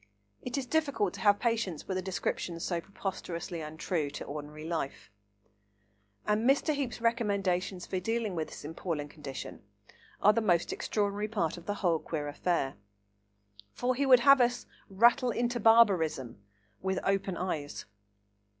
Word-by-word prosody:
It 250 Hz, +2 st, -4 dB
is 270 Hz, -, -2 dB
difficult 280 Hz, -, 0 dB
to -, -, -8 dB
have 205 Hz, -2 st, +4 dB
patience 225 Hz, -9 st, -1 dB
with 190 Hz, -, -2 dB
a 185 Hz, -, 0 dB
description 180 Hz, -2 st, -3 dB
so 170 Hz, 0 st, -2 dB
preposterously 175 Hz, -3 st, -5 dB
untrue 155 Hz, 0 st, -2 dB
to 145 Hz, -, -6 dB
ordinary 150 Hz, +1 st, -7 dB
life. 160 Hz, -9 st, -4 dB, 1.1 s
And 215 Hz, +4 st, +2 dB
Mr. 285 Hz, +3 st, +3 dB
Heape's 265 Hz, -5 st, -3 dB
recommendations 200 Hz, -6 st, 0 dB
for 185 Hz, -, -2 dB
dealing 225 Hz, +1 st, -1 dB
with 160 Hz, -3 st, -2 dB
this -, -, -10 dB
appalling 155 Hz, -2 st, -4 dB
condition 145 Hz, -3 st, -8 dB, 0.6 s
are 210 Hz, -, +6 dB
the 230 Hz, -, +1 dB
most 175 Hz, -5 st, +2 dB
extraordinary 205 Hz, 0 st, -1 dB
part 195 Hz, -7 st, -1 dB
of 175 Hz, -1 st, -12 dB
the 205 Hz, -, -1 dB
whole 165 Hz, -2 st, +3 dB
queer 150 Hz, -2 st, -4 dB
affair. 145 Hz, -, -1 dB, 1.0 s
For 250 Hz, +1 st, 0 dB
he 275 Hz, +2 st, 0 dB
would 255 Hz, -2 st, +7 dB
have 275 Hz, 0 st, +7 dB
us 245 Hz, 0 st, +1 dB, 0.2 s
"rattle 235 Hz, +6 st, +4 dB
into 240 Hz, +1 st, 0 dB
barbarism" 180 Hz, -, +4 dB, 0.4 s
with 190 Hz, 0 st, -1 dB
open 195 Hz, -2 st, 0 dB
eyes. 155 Hz, -5 st, -3 dB
190 Hz, 150 wpm, -30 LUFS, 165-230 Hz, 1.1 s, would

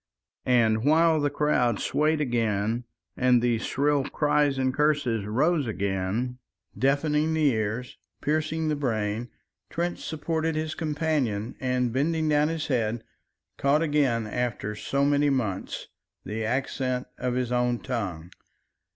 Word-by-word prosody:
and 115 Hz, -3 st, +3 dB
while 160 Hz, +2 st, +4 dB
the 145 Hz, -, +2 dB
crowd 135 Hz, -6 st, +1 dB
swayed 155 Hz, +1 st, +1 dB
again 115 Hz, -3 st, 0 dB, 0.3 s
and 125 Hz, -1 st, +4 dB
the 120 Hz, -1 st, +1 dB
shrill 145 Hz, +3 st, +1 dB
cries 145 Hz, -1 st, +1 dB
and 130 Hz, -1 st, +1 dB
curses 140 Hz, -7 st, +1 dB
rose 145 Hz, +6 st, +1 dB
again, 100 Hz, +5 st, -2 dB, 0.4 s
deafening 150 Hz, +3 st, +1 dB
the 155 Hz, -2 st, +4 dB
ears, 110 Hz, +3 st, -3 dB, 0.2 s
piercing 155 Hz, +2 st, 0 dB
the 155 Hz, -, +1 dB
brain, 115 Hz, -4 st, -2 dB, 0.4 s
Trench 175 Hz, +1 st, -2 dB
supported 160 Hz, +1 st, -2 dB
his 155 Hz, 0 st, -2 dB
companion, 145 Hz, -9 st, -1 dB
and 125 Hz, -2 st, 0 dB
bending 155 Hz, +4 st, +1 dB
down 150 Hz, 0 st, +3 dB
his 160 Hz, -1 st, -2 dB
head 115 Hz, -3 st, -1 dB, 0.5 s
caught 145 Hz, +3 st, +2 dB
again 140 Hz, -7 st, +1 dB
after 110 Hz, -2 st, -2 dB
so 135 Hz, +7 st, 0 dB
many 145 Hz, 0 st, +3 dB
months 110 Hz, -9 st, -2 dB, 0.4 s
the 110 Hz, +1 st, -3 dB
accent 130 Hz, +1 st, -1 dB
of 125 Hz, -1 st, -1 dB
his 125 Hz, -1 st, -1 dB
own 125 Hz, 0 st, +1 dB
tongue. 95 Hz, -10 st, -4 dB
130 Hz, 130 wpm, -26 LUFS, 115-150 Hz, 0.5 s, while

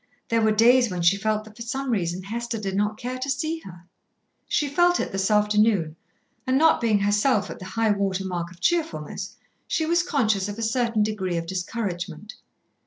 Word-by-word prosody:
There 230 Hz, 0 st, +2 dB
were 220 Hz, -, +3 dB
days 240 Hz, +3 st, +5 dB
when 180 Hz, -2 st, -3 dB
she 170 Hz, +3 st, +5 dB
felt 215 Hz, +1 st, -1 dB
that 215 Hz, 0 st, -15 dB
for 230 Hz, -, -12 dB
some 265 Hz, +3 st, -3 dB
reason 180 Hz, -4 st, -1 dB
Hester 235 Hz, +3 st, -4 dB
did 195 Hz, -3 st, -3 dB
not 210 Hz, +1 st, 0 dB
care 250 Hz, +2 st, -5 dB
to 265 Hz, +2 st, -3 dB
see 315 Hz, +4 st, -1 dB
her. 175 Hz, -, -13 dB, 0.6 s
She 295 Hz, -, +1 dB
felt 350 Hz, +5 st, +3 dB
it -, -, -2 dB
this 195 Hz, +1 st, 0 dB
afternoon, 210 Hz, -5 st, +2 dB, 0.5 s
and 260 Hz, +1 st, +3 dB
not 320 Hz, -1 st, +4 dB
being 225 Hz, -3 st, +3 dB
herself 205 Hz, +2 st, +2 dB
at -, -, -9 dB
the 185 Hz, -, -8 dB
high 220 Hz, +3 st, 0 dB
water 195 Hz, -1 st, -1 dB
mark 175 Hz, -2 st, -3 dB
of 175 Hz, 0 st, -16 dB
cheerfulness, 330 Hz, -, -2 dB, 0.3 s
she 320 Hz, -, 0 dB
was 340 Hz, +2 st, +3 dB
conscious 220 Hz, -, 0 dB
of 205 Hz, -, -6 dB
a 230 Hz, -, -3 dB
certain 230 Hz, -1 st, +1 dB
degree 190 Hz, -5 st, -2 dB
of 165 Hz, -, -3 dB
discouragement. 185 Hz, 0 st, -4 dB
215 Hz, 195 wpm, -24 LUFS, 190-245 Hz, 0.6 s, days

